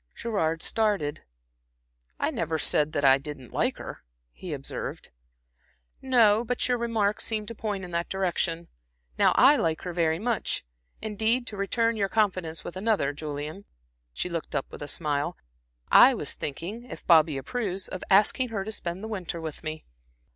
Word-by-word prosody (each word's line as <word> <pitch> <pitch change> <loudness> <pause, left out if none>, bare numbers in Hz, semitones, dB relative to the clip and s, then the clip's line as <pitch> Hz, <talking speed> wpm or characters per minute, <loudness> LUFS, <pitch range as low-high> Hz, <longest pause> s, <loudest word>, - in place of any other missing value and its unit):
Gerard 165 -8 -1
started. 200 -10 +1 1.0
"I - - +1
never 160 -1 -1
said 150 0 +3
that 145 -2 +1
I 135 0 +7
didn't 140 -4 -9
like - - +1
her," - - -8 0.3
he - - -8
observed. - - -5 0.9
"No, 230 -4 +4
but 245 +1 -1
your 245 -1 +1
remarks 220 -3 0
seemed 215 -2 -2
to - - -5
point 210 -3 -3
in 180 - -7
that 170 0 -2
direction. 170 -3 -1 0.5
Now - - +6
I 280 +3 +6
like 160 -7 0
her 180 - -4
very 165 -2 +1
much. 225 - -1 0.4
Indeed, 220 +3 0
to 215 - -6
return 230 +3 0
your 200 -2 0
confidence 185 -7 0
with 175 - -7
another, 190 -8 +1
Julian" 150 +5 -6 0.5
she 65 - -3
looked 170 -4 -4
up 140 - 0
with - - -10
a 145 - -5
smile 150 +2 -1 0.5
"I - - +8
was - - 0
thinking, 180 - -5
if - - -10
Bobby 160 -4 +5
approves, 190 - -3
of 185 - -6
asking 210 +6 +4
her 205 -4 -2
to 220 - -4
spend 180 -2 -4
the - - -4
winter 185 -6 -4
with 160 -2 -6
me. 155 0 -5
185 Hz, 170 wpm, -27 LUFS, 160-220 Hz, 1.0 s, I